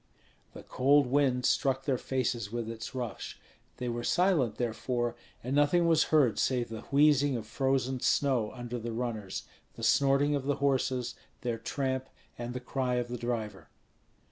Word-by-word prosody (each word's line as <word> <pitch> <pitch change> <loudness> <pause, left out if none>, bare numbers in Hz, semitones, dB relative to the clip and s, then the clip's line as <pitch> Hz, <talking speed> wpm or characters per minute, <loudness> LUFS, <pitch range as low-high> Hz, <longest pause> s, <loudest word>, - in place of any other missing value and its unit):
The - - -10
cold 140 +2 +3
wind 125 -1 +2
struck 135 -1 +1
their 130 -4 +1
faces 120 -5 -2
with 120 -1 -3
its 115 +3 -7
rush; 120 -4 -5 0.4
they 125 - -4
were 120 0 -3
silent, 175 - +2
therefore, 120 0 -2 0.3
and 130 +3 -2
nothing 145 +4 +4
was 165 -2 +4
heard 145 -8 +3
save 125 -3 +1
the 110 -1 -6
wheezing 145 -2 +4
of 110 - -6
frozen 130 +1 0
snow 125 -5 +1
under 120 -1 -5
the 115 0 -5
runners, 110 -5 -3 0.3
the 115 - -9
snorting 140 +4 +3
of 140 -2 -1
the 145 0 +1
horses, 130 -3 0 0.3
their 120 -2 -2
tramp, 130 +2 -2 0.3
and 120 +1 -6
the - - -2
cry 125 0 -1
of 120 -1 -1
the 125 - -4
driver. 115 -3 -4
125 Hz, 165 wpm, -30 LUFS, 120-140 Hz, 0.4 s, nothing